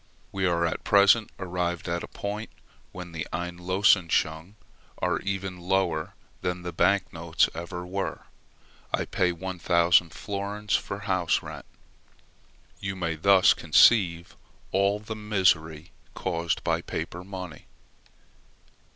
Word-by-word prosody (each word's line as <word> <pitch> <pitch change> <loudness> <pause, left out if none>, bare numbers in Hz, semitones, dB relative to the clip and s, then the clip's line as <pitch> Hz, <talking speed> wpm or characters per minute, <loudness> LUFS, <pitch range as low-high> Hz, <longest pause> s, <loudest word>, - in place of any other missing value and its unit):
We 95 -1 0
are 85 -1 +1
at 80 - -3
present 100 +2 +5
arrived 90 -2 -3
at 85 0 -1
a - - -7
point 105 +2 -5 0.4
when 90 -1 -8
the 80 -2 -5
Einlösungsscheine 90 0 +1 0.4
are 90 -1 0
even 95 -2 -4
lower 90 -3 -1 0.3
than 90 0 -3
the 90 -1 -5
bank 100 +3 +2
notes 80 0 +1
ever 90 +1 -6
were. 95 +2 -4 0.7
I - - 0
pay 90 -1 +1
1000 85 -1 +2
florins 100 +3 -3
for 100 +1 -3
house 95 -3 0
rent: - - -8 1.1
you 95 0 -4
may 85 -3 -2
thus 95 +3 +5
conceive 85 +1 +4 0.4
all 100 +2 +2
the 105 +1 -7
misery 90 -6 +1 0.2
caused 85 0 -2
by - - 0
paper 90 +1 -5
money. 95 -3 -8
90 Hz, 120 wpm, -27 LUFS, 85-100 Hz, 1.1 s, present